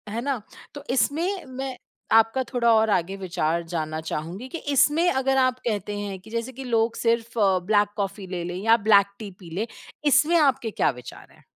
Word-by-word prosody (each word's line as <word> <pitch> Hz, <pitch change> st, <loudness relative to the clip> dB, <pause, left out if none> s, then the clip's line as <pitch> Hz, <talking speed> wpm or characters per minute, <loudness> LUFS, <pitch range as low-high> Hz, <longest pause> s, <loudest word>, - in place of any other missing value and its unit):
है 225 Hz, +3 st, -3 dB
ना? 270 Hz, -3 st, -2 dB, 0.3 s
तो 285 Hz, -, -9 dB
इसमें 335 Hz, +9 st, 0 dB
मैं 260 Hz, 0 st, -6 dB, 0.4 s
आपका 225 Hz, +4 st, +4 dB
थोड़ा 235 Hz, -2 st, +3 dB
और 220 Hz, 0 st, +3 dB
आगे 190 Hz, -1 st, 0 dB
विचार 170 Hz, -3 st, -1 dB
जानना 155 Hz, -2 st, -3 dB
चाहूँगी, 165 Hz, +9 st, -5 dB
कि 300 Hz, -, -6 dB
इसमें 295 Hz, +4 st, +3 dB
अगर 265 Hz, 0 st, +1 dB
आप 255 Hz, -1 st, +2 dB
कहते 205 Hz, -2 st, -2 dB
हैं 200 Hz, -2 st, -5 dB
कि 205 Hz, +4 st, -16 dB
जैसे 230 Hz, +2 st, -3 dB
कि 265 Hz, +2 st, -8 dB
लोग 230 Hz, -2 st, +1 dB
सिर्फ़ 230 Hz, 0 st, 0 dB, 0.3 s
ब्लैक 205 Hz, 0 st, +3 dB
कॉफी 200 Hz, -1 st, -3 dB
ले 180 Hz, -2 st, -4 dB
लें 175 Hz, +1 st, -5 dB
या 225 Hz, +1 st, +5 dB
ब्लैक 200 Hz, -2 st, +6 dB
टी 210 Hz, -3 st, -7 dB
पी 175 Hz, -4 st, -12 dB
लें, 210 Hz, +4 st, -1 dB, 0.4 s
इसमें 300 Hz, +4 st, +4 dB
आपके 270 Hz, -7 st, +2 dB
क्या -, -, +1 dB
विचार 125 Hz, -2 st, -12 dB
हैं? -, -, -22 dB
225 Hz, 190 wpm, -24 LUFS, 195-260 Hz, 0.4 s, ब्लैक